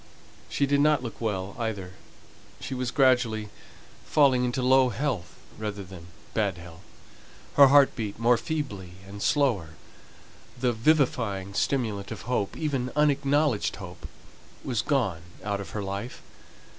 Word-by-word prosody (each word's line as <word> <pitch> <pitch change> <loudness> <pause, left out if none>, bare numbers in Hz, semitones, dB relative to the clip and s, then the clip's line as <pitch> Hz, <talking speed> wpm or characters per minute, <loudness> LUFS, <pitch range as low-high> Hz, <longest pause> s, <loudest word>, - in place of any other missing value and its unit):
She 140 - +1
did 140 +1 +2
not 150 -3 +3
look 115 -1 -7
well, 100 -3 -2
either: 100 -6 -3 0.7
she - - -5
was 125 -1 -2
gradually 125 -6 +2 0.5
falling 135 -4 +3
into 125 +1 -1
low 130 0 +5
health, 120 - -3 0.2
rather 105 -2 -4
than 90 -2 -11 0.3
bad 100 -5 0
health. 85 0 -12 0.7
Her 140 -1 +8
heart 140 0 +6
beat 105 -4 -4
more 120 +2 +4
feebly 115 - -4
and 100 +1 -9
slower; 105 - +1 0.8
the 125 -1 +1
vivifying 115 -7 +1
stimulant 105 -5 -1
of 110 - -7
hope 115 -4 -2
even 135 -5 -2
unacknowledged 145 -4 +2
hope 90 -3 -9 0.6
was 120 -5 -1
gone 115 - 0 0.2
out 100 -1 -2
of 100 - -8
her 105 - -4
life. 100 +5 -5
115 Hz, 135 wpm, -27 LUFS, 100-135 Hz, 0.8 s, Her